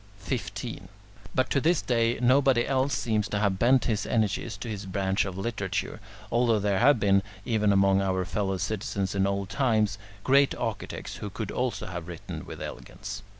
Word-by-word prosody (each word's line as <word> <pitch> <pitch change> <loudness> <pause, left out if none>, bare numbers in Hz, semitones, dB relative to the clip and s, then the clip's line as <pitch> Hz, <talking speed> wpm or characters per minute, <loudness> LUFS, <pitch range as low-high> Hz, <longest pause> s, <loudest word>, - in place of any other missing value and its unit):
15. 100 -1 -5 0.5
But 130 0 +1
to 140 - +2
this 165 +2 +3
day 115 -1 +1
nobody 130 0 +4
else 135 +1 +1
seems 110 -3 0
to 105 - -1
have 100 -2 +1
bent 125 +2 +4
his 110 -4 0
energies 110 -1 0
to 120 - -7
this 105 -3 -5
branch 95 0 0
of 95 -2 -5
literature, 100 -1 -3 0.3
although 120 -2 +3
there 100 -1 +1
have 135 +1 +5
been, 100 -1 +4 0.2
even 110 -4 +2
among 95 0 +4
our 95 -1 0
fellow 95 0 -1
citizens 95 0 -2
in 100 0 +2
old 100 -1 -2
times, 110 -3 +1 0.2
great 140 +1 +4
architects 115 -4 -4
who 105 - -5
could 105 +1 -5
also 125 -1 -2
have 90 -2 -6
written 85 -2 -7
with - - -7
elegance. - - -7
105 Hz, 175 wpm, -27 LUFS, 95-120 Hz, 0.5 s, have